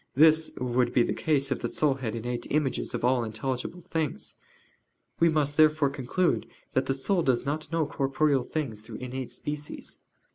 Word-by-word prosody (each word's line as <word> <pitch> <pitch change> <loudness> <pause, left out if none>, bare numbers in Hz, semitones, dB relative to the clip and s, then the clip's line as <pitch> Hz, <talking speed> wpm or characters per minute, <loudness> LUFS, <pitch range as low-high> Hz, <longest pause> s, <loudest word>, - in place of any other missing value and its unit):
This 155 +2 +5
would 125 0 +2
not - - -10
be 125 - +6
the - - 0
case 140 -4 0
if - - 0
the - - -2
soul 150 -3 +2
had 125 -4 -4
innate 120 +1 -4
images 145 -4 0
of - - -1
all 125 -1 +3
intelligible 130 +9 -3
things. 160 -3 -3 0.9
We 170 - +5
must 145 -2 0
therefore 155 -2 +5
conclude 140 +7 0 0.2
that 130 - +1
the 135 - +1
soul 175 +7 +1
does 130 -5 +1
not 155 +3 -3
know 165 -1 +1
corporeal 140 0 +1
things 120 -5 -4
through 110 - -10
innate 130 0 -5
species. 150 0 -5
140 Hz, 180 wpm, -28 LUFS, 125-155 Hz, 0.9 s, be